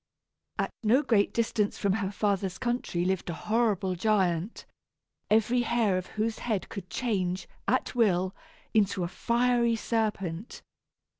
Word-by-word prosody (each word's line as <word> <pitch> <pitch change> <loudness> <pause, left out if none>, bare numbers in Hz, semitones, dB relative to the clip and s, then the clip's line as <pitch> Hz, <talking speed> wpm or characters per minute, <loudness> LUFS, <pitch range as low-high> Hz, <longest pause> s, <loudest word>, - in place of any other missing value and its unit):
At - - -1
no 245 +6 +4
great 205 -7 +3
distance 220 -3 0
from 200 -1 +1
her 200 -2 -1
father's 195 -2 -1
country 240 -8 -1
lived 190 -1 -1
a 170 - -3
horrible 215 -4 +1
giant, 185 -1 0 0.6
every 225 +3 +3
hair 230 -4 +2
of 185 0 -2
whose 220 +1 0
head 215 -5 -2
could 190 -4 -7
change, 190 -7 -1 0.2
at 255 - +1
will, 190 -6 +2 0.4
into 200 -4 +2
a - - -1
fiery 235 +3 +2
serpent. 215 -4 -2
210 Hz, 135 wpm, -28 LUFS, 185-230 Hz, 0.6 s, no